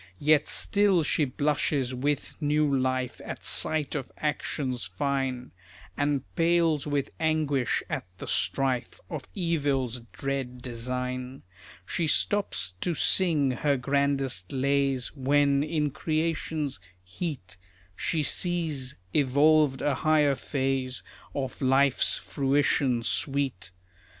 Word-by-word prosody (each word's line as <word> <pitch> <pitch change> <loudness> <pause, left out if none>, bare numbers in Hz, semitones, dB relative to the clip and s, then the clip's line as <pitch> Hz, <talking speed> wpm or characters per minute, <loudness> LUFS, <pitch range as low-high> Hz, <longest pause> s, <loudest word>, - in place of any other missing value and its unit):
Yet 150 +3 +3
still 200 -4 +3
she 150 0 +1
blushes 140 -1 0
with 140 +3 -1
new 150 -1 +2
life 130 -1 -1
At - - -7
sight 155 -2 +1
of 135 -3 -4
actions 140 -4 -2
fine, 130 +5 -2 0.4
And 145 -2 0
pales 165 -3 +2
with 145 -2 -1
anguish 155 -5 +1
at - - -4
the - - -7
strife 130 -3 0
Of 155 -5 -5
evil's 140 - 0
dread 135 -2 -4
design. 125 +2 -4 0.4
She 165 - -1
stops 125 - +1
to 175 - -1
sing 155 -6 +3
her 140 +3 +1
grandest 135 -7 0
lays 135 -1 0
When, 140 +1 +3
in 150 -1 0
creation's 155 - -2 0.2
heat, 95 - -6 0.4
She 155 - -1
sees 155 -6 0 0.2
evolved 145 0 +3
a 145 - +2
higher 150 0 +3
phase 130 -1 -2 0.3
Of 135 +1 -4
life's 135 0 +3
fruition 135 -3 +1
sweet. 135 -9 -1
140 Hz, 110 wpm, -27 LUFS, 130-150 Hz, 0.4 s, Yet